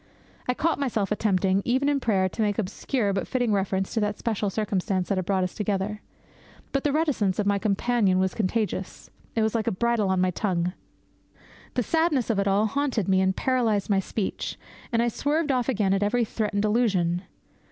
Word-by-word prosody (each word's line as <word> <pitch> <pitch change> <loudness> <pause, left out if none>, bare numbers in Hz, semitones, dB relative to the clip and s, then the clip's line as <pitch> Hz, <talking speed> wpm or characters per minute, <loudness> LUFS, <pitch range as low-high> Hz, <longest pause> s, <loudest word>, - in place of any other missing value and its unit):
I 250 - +1
caught 330 +2 0
myself 220 -8 -1
attempting, 195 -2 +2
even 260 +4 +1
in 285 -1 +2
prayer, 195 -7 +2
to 205 - -4
make 205 -2 +1
obscure 210 +1 -1
but 195 - -2
fitting 245 -4 0
reference 190 -1 0
to 225 - +1
the 210 -1 +1
special 210 -1 -2
circumstances 195 -2 -1
that 195 - +1
had 185 - -3
brought 190 -2 +2
us 180 - -3
together. 210 0 -2 0.7
But 275 - 0
the 290 - +2
reticence 275 - +1
of 210 - 0
my 200 0 +2
companion 210 -1 +2
was 190 0 +1
contagious. 200 -3 -2 0.2
It 225 - +2
was 220 - +1
like 225 -2 -1
a - - +3
bridle 230 0 +1
on 190 -1 +2
my 185 0 +2
tongue. 180 -2 -1 1.0
The 250 - +1
sadness 305 - +1
of 205 - 0
it 200 - +1
all 200 +2 +3
haunted 255 -3 -1
me, 190 -1 +3
and 190 0 +2
paralysed 225 -6 +1
my 195 - +4
speech; 195 +1 -3 0.3
and 230 0 +2
I - - +1
swerved 290 +6 0
off 250 -1 0
again 205 -6 +2
at 195 - +1
every 230 +3 +2
threatened 210 -1 -1
allusion. 195 -6 +1
210 Hz, 195 wpm, -26 LUFS, 190-240 Hz, 1.0 s, my